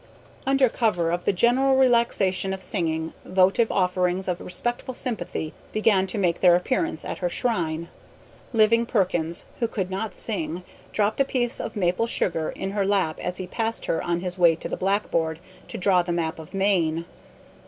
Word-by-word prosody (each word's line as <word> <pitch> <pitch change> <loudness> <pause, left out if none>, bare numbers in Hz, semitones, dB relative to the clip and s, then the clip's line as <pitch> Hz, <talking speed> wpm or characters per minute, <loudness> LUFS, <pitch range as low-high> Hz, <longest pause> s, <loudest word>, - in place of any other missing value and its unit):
Under 270 -1 +4
cover 195 -8 0
of 175 0 -2
the - - +4
general 250 +7 +3
relaxation 235 -7 +2
of 190 - -7
singing, 160 -5 -2
votive 190 +5 +3
offerings 180 0 +1
of 180 -1 -2
respectful 240 +7 -4
sympathy 180 - -3 0.2
began 210 -3 +2
to 185 - -2
make 175 -4 +1
their 180 -2 +7
appearance 175 -2 -1
at - - -5
her 180 - 0
shrine. 170 -8 -1 0.6
Living 230 0 +4
Perkins, 175 -6 0
who 235 - +1
could 190 -4 -3
not 195 +1 -4
sing, 175 -5 -3 0.3
dropped 215 +2 0
a - - +7
piece 245 -3 -1
of - - -5
maple 185 +3 +1
sugar 165 -8 0
in 195 - -4
her 200 0 0
lap 195 -5 +1
as 180 0 -3
he 185 - -4
passed 225 +5 -3
her - - 0
on 175 0 -1
his 180 0 -5
way 170 -2 +6
to - - -6
the - - -3
blackboard 185 -5 0 0.3
to - - -6
draw 185 -1 +3
the 175 0 -4
map 165 -1 -2
of 160 +4 -10
Maine. 170 -5 +1
185 Hz, 175 wpm, -25 LUFS, 175-220 Hz, 0.6 s, their